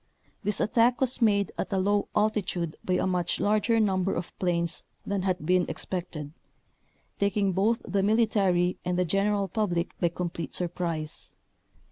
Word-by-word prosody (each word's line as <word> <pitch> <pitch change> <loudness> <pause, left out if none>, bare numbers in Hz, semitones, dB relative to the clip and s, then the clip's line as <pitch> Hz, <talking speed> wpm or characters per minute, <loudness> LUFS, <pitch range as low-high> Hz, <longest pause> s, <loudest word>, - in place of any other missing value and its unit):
This 210 0 -1
attack 235 +2 +3
was 255 -1 +1
made 200 -3 +3
at - - -2
a 195 - +1
low 205 +2 +1
altitude 200 -6 0
by 185 - 0
a - - +1
much 180 -2 0
larger 215 +2 +2
number 190 -3 +1
of 170 - -5
planes 170 -2 0 0.2
than 200 -1 -1
had 180 -4 -1
been 180 +1 +3
expected, 165 -5 -5 0.9
taking 200 -1 +2
both 210 +5 +1
the 200 - +1
mili 220 +3 +3
tary 180 -4 +1
and 180 0 -1
the 180 - +2
general 200 +3 +1
public 175 -4 -1
by 170 - +2
complete 170 -3 -4
sur 175 -1 -1
prise. 165 -3 -4
190 Hz, 160 wpm, -27 LUFS, 175-210 Hz, 0.9 s, attack